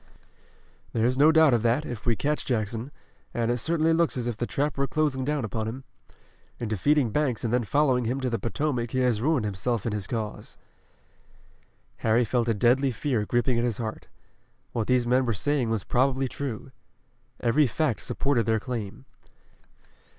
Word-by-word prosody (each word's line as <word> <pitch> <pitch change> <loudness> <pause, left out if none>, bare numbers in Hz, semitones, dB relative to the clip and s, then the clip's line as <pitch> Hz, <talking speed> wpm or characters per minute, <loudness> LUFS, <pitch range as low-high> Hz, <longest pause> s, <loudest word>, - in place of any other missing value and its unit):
"There's 120 +3 +2
no 145 +4 +6
doubt 160 -4 +5
of 120 - +2
that, 120 +6 +1
if 120 -1 -7
we 115 - +3
catch 150 +6 -1
Jackson, 115 +1 -2 0.5
and 120 0 +1
it 120 - -1
certainly 165 +4 +1
looks 165 -4 +1
as 120 - -2
if 120 -2 -2
the 120 +2 -3
trap 145 +2 -1
were 140 0 0
closing 145 -4 0
down 145 -2 -1
upon 110 0 -3
him. 130 +4 -6 0.8
In 120 - -3
defeating 120 +4 +2
Banks 135 -2 0
and 115 -1 -1
then 125 -1 +2
following 130 +1 +2
him 125 +4 -1
to 130 - 0
the 115 - -1
Potomac 120 -1 -2
he 130 - -1
has 120 -4 +1
ruined 140 -4 +1
himself 105 +3 -2
and 115 - -1
his 105 -2 -3
cause." 110 -3 -5 1.4
Harry 115 +2 +2
felt 120 +1 0
a 115 - +2
deadly 125 +6 +3
fear 120 -3 -1
gripping 120 0 +1
at - - 0
his 120 -4 -1
heart. 110 -2 -5 0.6
What 115 -3 -2
these 125 -1 +2
men 125 +2 +3
were 120 -2 0
saying 135 +3 0
was 110 -4 -1
probably 130 +3 +1
true. 130 -2 -6 0.7
Every 135 +5 +3
fact 140 -3 0
supported 130 -6 0
their 110 -1 +2
claim. 115 0 -6
120 Hz, 180 wpm, -26 LUFS, 115-140 Hz, 1.4 s, no